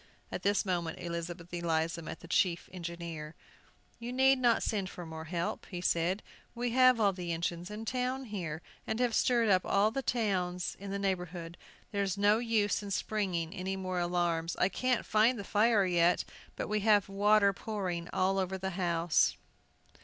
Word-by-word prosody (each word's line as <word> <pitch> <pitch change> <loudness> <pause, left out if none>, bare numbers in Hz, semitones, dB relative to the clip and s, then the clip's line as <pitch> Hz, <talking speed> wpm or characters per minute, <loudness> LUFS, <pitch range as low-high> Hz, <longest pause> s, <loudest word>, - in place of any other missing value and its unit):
At - - -4
this 200 0 +2
moment 170 -4 -1
Elizabeth 170 0 -6
Eliza 165 -1 0
met 160 - -7
the - - -11
chief 175 0 +1
engineer. 170 -3 -6 0.6
"You 235 +1 -5
need 265 +1 +4
not 240 -2 +3
send 200 -4 -1
for 175 - -8
more 160 0 -7
help," 170 +1 -3
he 180 - -5
said; 175 +3 0 0.3
"we 240 0 -1
have 255 -1 +5
all 200 -3 +3
the 180 -2 -4
engines 170 +2 -2
in 210 +2 -6
town 255 +2 -2
here, 175 -8 -5 0.2
and 220 - -2
have 245 -2 +1
stirred 235 0 +3
up 185 -3 +4
all 205 +2 +3
the 270 - -2
towns 185 -8 -1
in 200 +1 -7
the 200 - -2
neighborhood; 180 -3 -3 0.4
there's 200 -2 -1
no 205 +2 +4
use 220 -4 +1
in 205 - -7
springing 185 -4 -1
any 190 0 -3
more 185 -1 -3
alarms. 175 -1 0
I 185 - +2
can't 255 +2 0
find 225 +3 +3
the 200 - -5
fire 210 0 +3
yet, 175 -1 +3 0.3
but - - -3
we 210 0 0
have 205 -1 +4
water 200 0 +4
pouring 180 -5 -4
all 190 +1 +1
over 190 0 -1
the 190 0 -3
house." 170 -2 +2
190 Hz, 175 wpm, -31 LUFS, 170-215 Hz, 0.6 s, have